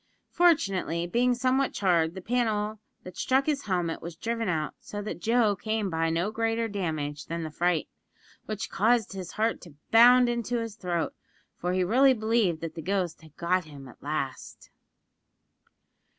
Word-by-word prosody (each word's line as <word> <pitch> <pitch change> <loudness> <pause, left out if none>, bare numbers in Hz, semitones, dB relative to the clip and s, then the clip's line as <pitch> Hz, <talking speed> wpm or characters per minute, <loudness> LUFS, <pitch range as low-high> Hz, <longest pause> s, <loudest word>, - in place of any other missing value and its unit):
Fortunately, 195 - +2
being 245 +7 +2
somewhat 260 +2 +1
charred, 170 -4 +2
the 190 - -7
panel 220 -2 0 0.2
that 185 -1 -10
struck 265 +1 +2
his 290 -2 -1
helmet 175 -4 -1
was 170 0 -7
driven 230 +3 -2
out, 155 -3 -1
so 205 - -7
that 205 -3 -5
Joe 225 0 +3
came 215 0 -2
by 165 0 0
no 170 +6 0
greater 225 +1 0
damage 155 -8 -3
than 165 0 -3
the 155 - -5
fright, 175 0 0 0.6
which 215 -1 -4
caused 220 +3 +2
his 185 -3 -7
heart 225 +1 0
to 165 -5 -13 0.2
bound 245 +2 +7
into 240 0 -1
his 230 -2 -4
throat, 175 -5 -2 0.4
for 180 +1 -2
he 185 0 +2
really 260 +8 +5
believed 220 -7 +1
that 165 -1 -5
the 165 - -6
ghost 180 -2 -2
had 155 -2 -18
got 180 +1 +1
him 140 -3 -11
at 125 - -15
last! 140 -3 -5
195 Hz, 165 wpm, -27 LUFS, 170-230 Hz, 0.6 s, bound